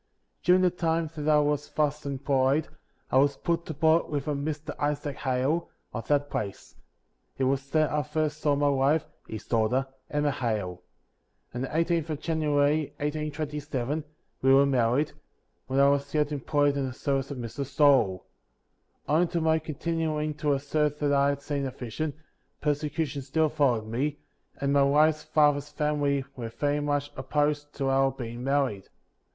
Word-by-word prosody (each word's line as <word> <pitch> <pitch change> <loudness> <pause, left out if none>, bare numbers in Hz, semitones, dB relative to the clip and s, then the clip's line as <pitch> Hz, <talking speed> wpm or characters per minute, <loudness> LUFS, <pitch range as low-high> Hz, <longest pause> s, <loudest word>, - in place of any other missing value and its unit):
During 180 +1 +5
the 180 - +4
time 165 -2 -1
that 150 0 -2
I 150 - +6
was 150 0 +1
thus 150 -1 -1
employed, 140 +2 +1 0.4
I - - +4
was 140 0 +3
put 170 +1 -1
to 160 - -5
board 160 +2 +3
with 145 -1 -3
a 150 - +1
Mr. 145 +1 -3
Isaac 145 -1 -2
Hale, 135 +6 0 0.2
of 115 -2 -5
that 145 -1 +1
place; 100 -2 -4 0.6
it 135 - 0
was 135 +1 0
there 155 0 +2
I 150 - +2
first 150 +1 -2
saw 145 -2 +3
my 145 0 +2
wife 140 +3 +2 0.2
(his 110 - -7
daugh 110 -2 +2
ter), 130 +2 +1 0.2
Emma 145 0 +1
Hale. 105 -9 -2 0.7
On 125 - -4
the 135 - -2
18th 165 +1 0
of 150 -2 -3
January, 150 -2 +1
1827, 150 -1 -3 0.4
we 135 - +4
were 135 +1 +7
married, 130 +2 +2 0.6
while 135 +1 0
I 140 - +6
was 140 0 0
yet 150 -1 +2
employed 145 0 +1
in 135 -1 0
the 130 - -5
service 135 0 -1
of 140 - -5
Mr. 120 +3 -4
Stoal. 135 - +3 0.8
58. - - -1
Owing 170 +3 +4
to 170 0 -2
my 160 0 +3
continuing 155 -1 -2
to 150 -1 0
assert 150 +1 0
that 145 -1 +1
I 140 0 +4
had 140 0 -3
seen 140 -2 -2
a - - -2
vision, 130 +4 -4 0.4
persecution 150 -1 -1
still 155 +4 +1
followed 135 -8 +1
me, 135 +7 -2 0.4
and 140 0 0
my 140 - +5
wife's 150 +3 +4
father's 150 -2 +2
family 145 -2 0
"were 115 -3 -5
very 145 +5 -1
much 145 0 -1
opposed 145 +2 -1
to 135 -1 -1
our 135 0 +3
being 120 -2 -7
married. 135 -8 0
145 Hz, 170 wpm, -27 LUFS, 135-150 Hz, 0.8 s, were